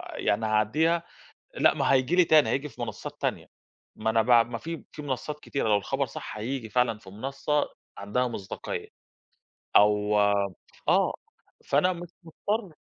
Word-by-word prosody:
يعني 110 +2 0
هاعدّيها، 150 +11 +2 0.5
لأ - - +4
ما - - +2
هييجي 130 +5 +3
لي 180 - +7
تاني، 155 -2 +5
هييجي 140 +2 -1
في - - -15
منصّات 110 -3 -6
تانية، - - -2 0.5
ما 110 +1 0
أنا 110 0 +3
ب - - -8 0.2
ما 115 - -3
في 165 +5 -6
في 150 - -8
منصّات 145 +2 -4
كتيرة 140 -6 -2
لو 105 - +5
الخبر 100 - -1
صح - - -8
هييجي 120 +1 -3
فعلًا 125 -3 +2
في 95 - -14
منصّة 135 +6 -1 0.3
عندها 115 +6 0
مصداقية، 100 -5 -5 0.9
أو 105 0 +5 0.7
آه، - - +3 0.5
فأنا 165 +7 +3
مش 175 0 -8
مضطر 195 +2 -3
130 Hz, 155 wpm, -27 LUFS, 110-155 Hz, 0.9 s, لي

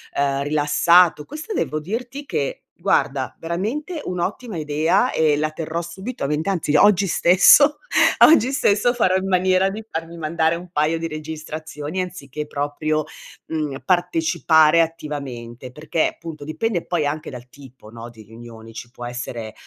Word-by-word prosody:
ehm, 140 0 0
rilassato, 155 +3 +3
questa 310 +8 -7
devo 155 - -1
dirti 240 - -5
che, - - -3 0.2
guarda, - - 0
veramente 230 - -4
un'ottima 185 +4 -4
idea 155 +9 +1
e 155 -2 +2
la 155 +1 -1
terrò 160 +1 -4
subito 190 - -6
a - - -1
mente, 150 +5 -1
anzi 165 -6 -1
oggi 200 +3 +5
stesso, 190 - +5 0.5
oggi 265 -5 +5
stesso 240 -3 +2
farò 185 -6 +2
in 190 0 -1
maniera 185 +1 +2
di 210 +3 -6
farmi 165 +1 -6
mandare 160 +1 0
un 175 +1 -9
paio 155 0 +1
di 165 - -3
registrazioni 155 +1 -6
anziché 150 -5 -6
proprio, 150 +1 -2 0.4
mhmm, 150 -4 -3
partecipare 175 - +3
attivamente, 135 -7 -5
perché, 155 +4 -1
appunto, 160 -3 -8
dipende 175 +5 -2
poi 170 -4 -1
anche 150 +2 -3
dal 125 -1 -10
tipo, 130 -5 -15
no, 115 +1 -9
di 110 -2 -15
riunioni. 115 +1 -13
Ci 120 +1 -9
può 120 -1 -9
essere, 120 -2 -6
160 Hz, 150 wpm, -21 LUFS, 145-185 Hz, 0.5 s, oggi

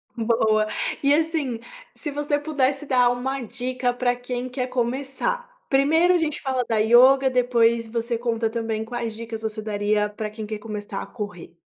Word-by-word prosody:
Boa. 220 -2 +2 0.3
E, 280 0 +4
assim, 305 -6 0 0.4
se 295 - -5
você 290 0 0
pudesse 290 -1 0
dar 250 -3 +4
uma 265 +2 -2
dica 250 +1 -2
pra 245 0 +1
quem 245 0 -4
quer 250 0 -2
começar. 270 - -2 0.2
Primeiro 320 +6 +4
a 355 - +4
gente 310 -3 -1
fala 260 -3 0
da 225 - +2
yoga 255 +5 +6
depois 235 -2 +2
você 235 +1 -2
conta 230 -1 0
também 225 -1 -2
quais 235 -2 -4
dicas 225 0 -6
você 220 -1 -4
daria 210 0 0
pra 210 0 -5
quem 215 0 -7
quer 215 0 -5
começar 205 -2 -5
a - - -6
correr. 180 -5 -7
245 Hz, 170 wpm, -24 LUFS, 225-270 Hz, 0.4 s, yoga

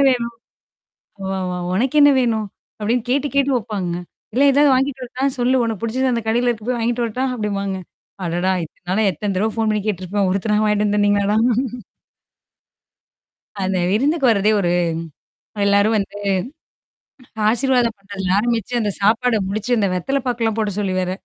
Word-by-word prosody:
வேணும். 235 -2 0 0.9
ஒ, - - -4 0.3
ஒ - - -3 0.2
உனக்கு 250 +9 0
என்ன 290 - +7
வேணும்? 225 -4 0 0.3
அப்பிடின்னு 225 +3 -1
கேட்டு 280 +2 +1
கேட்டு 280 0 +3
வைப்பாங்கங்க. 195 -7 -3 0.4
"இல்ல 260 +5 +3
ஏதாவது 285 +1 +4
வாங்கிட்டு 265 0 0
வரட்டா! 255 +2 -3
சொல்லு 255 +1 +3
உனக்கு 225 -4 -3
புடிச்சுது 255 +3 0
அந்த 230 -2 -2
கடையில 240 +2 +2
இருக்கு 225 -1 -3
போய் 250 - 0
வாங்கிட்டு 235 +1 0
வரட்டா!" 250 +4 -2
அப்பிடிம்பாங்க. 200 -4 -2 0.5
அடடா! 175 +3 0
இத்தன 165 - -13
நாளு 215 +2 +2
எத்தன 200 +4 -3
தடவ 215 +3 +1
ஃபோன் 225 -1 +1
பண்ணி 210 -1 0
கேட்டுருப்பேன். 195 0 -1
ஒருத்தனா 210 +2 +1
வாங்கிட்டு 210 0 +2
வந்து 205 - +1
தந்தீங்களாடா? 205 0 +2 2.3
அந்த 190 0 0
விருந்துக்கு 275 - +2
வர்றதே 210 0 +3
ஒரு 175 -3 +1 1.0
எல்லாரும் 200 +2 +3
வந்து 200 0 -4 1.3
ஆசிர்வாதம் 245 -1 +2
பண்றதுல 195 -2 -2
ஆரம்பிச்சு 235 +1 -1
அந்த 210 - 0
சாப்பாட 225 +3 +3
முடிச்சு 215 +5 -1
அந்த 205 -3 +2
வெத்தல 270 +10 -1
பாக்குலாம் 230 -3 0
போட 210 -1 0
சொல்லி 195 -2 -1
வேற, 185 0 -1
220 Hz, 150 wpm, -20 LUFS, 200-245 Hz, 2.3 s, என்ன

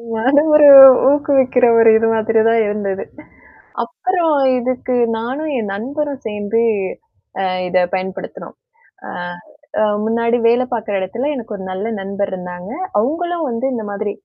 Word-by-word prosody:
நானும், 285 +7 +2
ஒரு 295 -1 +7 0.4
ஊக்குவிக்கிற 270 -3 +2
ஒரு 225 0 +6
இது 225 0 0
மாதிரிதான் 225 +1 +2
இருந்தது. 200 -2 -3 0.8
அப்புறம் 350 -4 -1 0.2
இதுக்கு 255 +1 -3 0.2
நானும் 270 +7 -4
என் 210 -4 -4
நண்பரும் 280 +5 -5
சேர்ந்து 210 +2 -2 1.1
இதைப் 180 0 0
பயன்படுத்தினோம். 190 0 -6 0.5
அ. - - -9 0.9
முன்னாடி 230 +2 0
வேலை 245 +2 +2
பார்க்கிற 220 -3 -4
இடத்துல 235 +10 -3
எனக்கு 230 -4 -7
ஒரு 190 - -8
நல்ல 195 +4 -4
நண்பர் 200 +1 -4
இருந்தாங்க. 180 0 -8 0.3
அவங்களும் 330 +6 -2
வந்து 230 +3 -3
இந்த 225 -3 -4
மாதிரி 205 0 -4
230 Hz, 120 wpm, -17 LUFS, 205-270 Hz, 1.1 s, ஒரு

